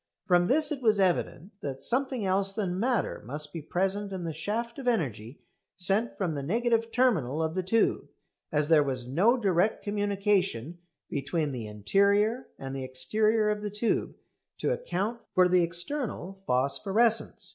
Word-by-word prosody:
From 175 -1 +3
this 300 +5 +2
it 285 -3 -3
was 215 -4 +3
evident 185 -1 0
that 135 -2 -5
something 255 -3 0
else 195 +1 +1
than 190 -4 -2
matter 245 +2 0
must 145 +6 -4
be 165 - -5
present 195 +6 -1
in 185 -2 -4
the 165 -1 -3
shaft 230 - -3
of 260 - -6
energy 130 - -2 0.3
sent 195 +5 0
from 180 -5 -1
the 145 - -3
negative 230 - 0
terminal 175 - +2
of 160 0 -1
the 185 - 0
tube, 215 +5 +1 0.4
as 150 -1 +1
there 160 -2 +6
was 130 -4 -2
no 195 - +3
direct 195 -2 +1
communication 200 - 0 0.3
between 145 +2 -2
the 120 -4 -5
interior 200 - +2
and 135 0 -6
the 135 - -4
exterior 215 - +1
of 210 0 -3
the 210 - -3
tube 210 +3 -1 0.4
to - - 0
account 235 - -3
for 185 -1 +6
the 180 0 +4
external 180 - -1
phosphorescence. 195 - +1
195 Hz, 160 wpm, -28 LUFS, 155-220 Hz, 0.4 s, there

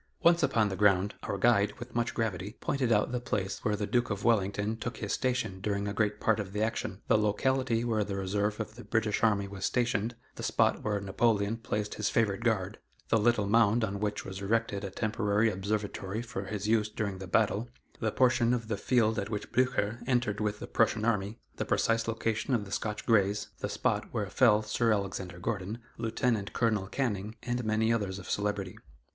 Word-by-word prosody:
Once 170 0 +5
upon 115 -7 +3
the 95 - -3
ground, 100 0 +3
our 100 - -3
guide, 105 -1 +3
with 120 +1 -9
much 120 0 -1
gravity, 105 -2 -2
pointed 130 -4 0
out 105 +2 +3
the 125 - -1
place 100 -5 -3
where 105 - +1
the 105 0 -2
Duke 120 +3 +1
of 100 -2 -3
Wellington 105 -1 +1
took 115 0 -5
his 105 - -3
station 125 -7 -1
during 100 0 -1
a 100 - -2
great 105 0 0
part 110 -1 +2
of 100 -2 -5
the 105 +1 0
action; 110 -3 -3
the 110 - +4
locality 115 +3 +1
where 110 -3 +1
the 100 -1 -4
reserve 100 +2 -1
of 110 0 -4
the 120 +2 -11
British 115 -2 0
army 105 -3 +2
was 95 -1 -8
stationed; 120 0 0 0.2
the - - -6
spot - - +2
where 105 -1 0
Napoleon 100 +1 +1
placed 105 -2 -3
his 105 - -1
favorite 105 -4 +1
guard; 105 -3 0 0.3
the 115 - +4
little 110 -1 +3
mound 115 +2 +4
on 100 -2 -2
which 105 0 -2
was 95 0 -6
erected 105 0 0
a 100 - -3
temporary 105 +1 +1
observatory 100 +1 -3
for 120 +1 -5
his 105 -1 -4
use 110 -1 +2
during 100 -3 -3
the 95 - -7
battle; 110 +3 +1 0.3
the 110 -2 0
portion 120 -1 +3
of 115 -2 -5
the 105 - -1
field 110 -1 +2
at 100 - -3
which 105 -2 -4
Blucher 120 -3 +1
entered 120 -5 +1
with 105 -1 -1
the - - -7
Prussian 110 - +1
army; 105 -1 0 0.2
the - - -1
precise 115 0 +1
location 115 +2 0
of 105 -3 -1
the 100 - -11
Scotch 105 -1 -3
Greys; 105 -3 +2
the - - -3
spot - - 0
where - - -2
fell 105 +1 +4
Sir 115 +2 +1
Alexander 95 -3 -2
Gordon, 100 +2 -3 0.2
Lieut. 115 -2 0
Col. 110 -5 +1
Canning, 110 -3 -2
and 120 0 -2
many 110 +1 +2
others 100 -4 -1
of 95 - -9
celebrity. 100 -1 -2
105 Hz, 200 wpm, -30 LUFS, 100-115 Hz, 0.3 s, Once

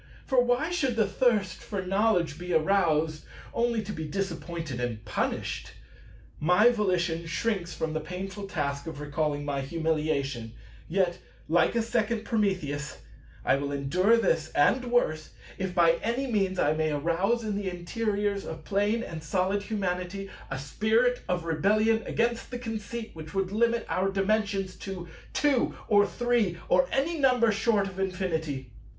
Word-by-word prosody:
For 255 -2 +4
why 245 +7 +1
should 270 -9 0
the 220 -2 +3
thirst 200 -3 +1
for 200 -3 -4
knowledge 185 -5 +1
be 180 0 -3
aroused, 160 -3 +2 0.3
only 235 -2 +1
to 210 - -5
be 160 -5 -4
disappointed 165 -5 -4
and 115 -3 -3
punished? 105 - -2 0.7
My 180 +9 +5
volition 175 -6 0
shrinks 180 -1 -1
from 160 -1 -2
the 155 - 0
painful 190 +4 -6
task 140 -4 -2
of 160 -3 -6
recalling 145 0 -1
my 140 -1 -1
humiliation; 140 -6 -1 0.3
yet, 180 0 +1 0.3
like 175 +7 +3
a 230 - +2
second 225 -1 0
Prometheus, 185 - -1 0.5
I - - +4
will 140 0 -3
endure 175 +11 +3
this 165 -8 +1
and 250 - +4
worse, 200 -11 0 0.3
if 190 -1 -3
by 170 -1 +5
any 235 +4 0
means 195 -6 0
I 150 -3 +3
may 155 0 0
arouse 170 +10 +1
in 210 -2 -2
the 200 -2 -2
interiors 200 +2 -1
of 160 -1 -7
Plane 205 +4 +1
and 160 -7 -7
Solid 185 +5 0
Humanity 195 -2 -3 0.2
a 135 - -3
spirit 220 - +1
of 180 -2 0
rebellion 215 +8 +2
against 235 0 0
the 250 - -4
Conceit 225 -1 -5
which 155 0 -9
would 195 -1 0
limit 230 +2 +2
our 190 +1 +1
Dimensions 195 -1 0
to 185 -3 -6 0.3
Two 285 -4 +2
or 205 -1 +5
Three 240 -8 +1
or 180 0 +4
any 310 +5 0
number 250 -4 +4
short 210 -1 +2
of 190 0 -8
Infinity. 160 - -2
190 Hz, 155 wpm, -28 LUFS, 160-220 Hz, 0.7 s, My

